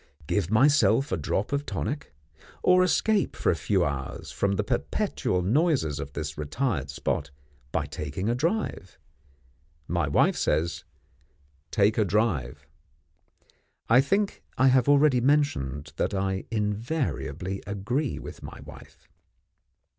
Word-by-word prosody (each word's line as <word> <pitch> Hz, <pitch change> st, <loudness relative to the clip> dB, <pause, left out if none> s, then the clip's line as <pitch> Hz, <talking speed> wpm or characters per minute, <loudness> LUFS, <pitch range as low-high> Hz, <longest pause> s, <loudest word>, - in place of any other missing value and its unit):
Give 90 Hz, +3 st, 0 dB
myself 130 Hz, +1 st, +4 dB
a -, -, +2 dB
drop 95 Hz, +5 st, -2 dB
of 140 Hz, 0 st, 0 dB
tonic? 145 Hz, 0 st, -4 dB, 0.5 s
or 180 Hz, 0 st, +5 dB
escape 205 Hz, +2 st, +1 dB
for -, -, +1 dB
a -, -, 0 dB
few 90 Hz, +3 st, +1 dB
hours 70 Hz, -2 st, -4 dB
from 100 Hz, 0 st, 0 dB
the 100 Hz, -, 0 dB
perpetual 90 Hz, -1 st, -1 dB
noises 120 Hz, -, +1 dB
of 70 Hz, 0 st, -6 dB
this 75 Hz, -1 st, -5 dB
retired 75 Hz, -, -2 dB
spot, 70 Hz, -, -2 dB, 0.4 s
by 80 Hz, -3 st, 0 dB
taking 75 Hz, +5 st, -4 dB
a 115 Hz, -, +2 dB
drive? 150 Hz, -, -2 dB, 0.9 s
My -, -, 0 dB
wife -, -, +3 dB
says, 85 Hz, +2 st, 0 dB, 0.8 s
take 105 Hz, +3 st, +2 dB
a -, -, +5 dB
drive. 85 Hz, -, 0 dB, 1.2 s
I 120 Hz, +3 st, +7 dB
think 195 Hz, +8 st, 0 dB, 0.2 s
I 130 Hz, +1 st, +5 dB
have 130 Hz, 0 st, +3 dB
already 140 Hz, -3 st, +5 dB
mentioned 80 Hz, -, 0 dB
that -, -, 0 dB
I 95 Hz, 0 st, -1 dB
invariably 105 Hz, -, -2 dB
agree 120 Hz, +9 st, -2 dB
with -, -, -9 dB
my -, -, -9 dB
wife. -, -, -14 dB
105 Hz, 130 wpm, -27 LUFS, -, 1.2 s, I